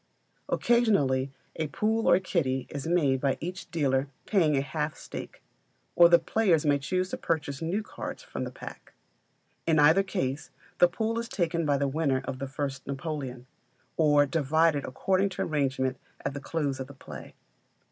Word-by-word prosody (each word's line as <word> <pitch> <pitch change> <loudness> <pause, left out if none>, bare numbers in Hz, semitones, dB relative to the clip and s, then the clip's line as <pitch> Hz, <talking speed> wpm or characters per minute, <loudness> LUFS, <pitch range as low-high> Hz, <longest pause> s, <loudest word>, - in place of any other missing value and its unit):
Occasionally 145 - +2 0.3
a 160 - -1
pool 220 +9 +1
or 175 - +6
kitty 135 -9 -1
is 145 +2 -5
made 145 -7 +2
by 140 -2 +1
each 180 +3 -6
dealer 140 -4 +1 0.2
paying 160 -8 +3
a - - +2
half 150 +2 -3
stake; - - -8 0.5
or 170 -1 +8
the 170 - +8
players 170 -3 +2
may 145 -1 +3 0.4
purchase 145 -3 -2
new 180 +7 -1
cards 230 - -7
from - - -5
the - - -4
pack. - - -11 0.7
In 160 -1 +4
either 150 +5 +6
case, 140 -7 -3 0.3
the 175 - +8
pool 220 +6 -2
is 235 0 -5
taken 170 -3 0
by 145 -1 +3
the 140 0 +1
winner 135 -2 0
of 130 - -5
the 135 - -3
first 135 0 -4
Napoleon, 135 -3 -4 0.5
or 145 -2 +4
divided 155 0 +2
according 190 +8 +1
to - - -3
arrangement 135 -3 0 0.3
at 135 - -1
the 145 - -6
close 145 -2 -2
of 130 - -5
the 140 - -12
play. - - -10
150 Hz, 165 wpm, -28 LUFS, 135-175 Hz, 0.7 s, or